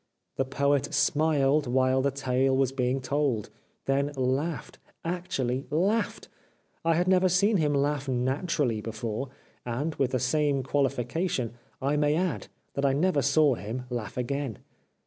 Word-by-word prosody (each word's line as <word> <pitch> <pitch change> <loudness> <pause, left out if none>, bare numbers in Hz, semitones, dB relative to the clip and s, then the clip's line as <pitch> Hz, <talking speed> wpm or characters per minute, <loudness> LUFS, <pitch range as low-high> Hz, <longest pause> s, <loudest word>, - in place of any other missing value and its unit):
The 135 - +1
Poet 140 +1 +1
smiled 145 0 +2
while 130 +1 +2
the 140 - +2
tale 130 0 +1
was 135 -1 +2
being 130 0 0
told, 130 -5 -1 0.3
then 140 +1 +1
laughed 135 +2 -2
— - - -31
actuUy 135 -7 -2
laughed. 195 +9 0 0.6
I 165 0 +3
had 175 +2 +1
never 185 0 +4
seen 200 +4 +3
him 150 -3 +1
laugh 140 0 0
naturally 130 - 0
before, 115 +3 -4 0.3
and, 135 +7 -2
with 135 - +2
the 130 - 0
same 140 +1 +1
qualification, 135 0 -1 0.3
I 145 +2 +1
may 150 0 +2
add 175 -1 -1 0.3
that 140 - -2
I 135 -1 +3
never 150 +1 +2
saw 140 +1 +4
him 115 +4 -5
laugh 120 -3 -4
again. 130 -2 -2
140 Hz, 145 wpm, -28 LUFS, 130-150 Hz, 0.6 s, never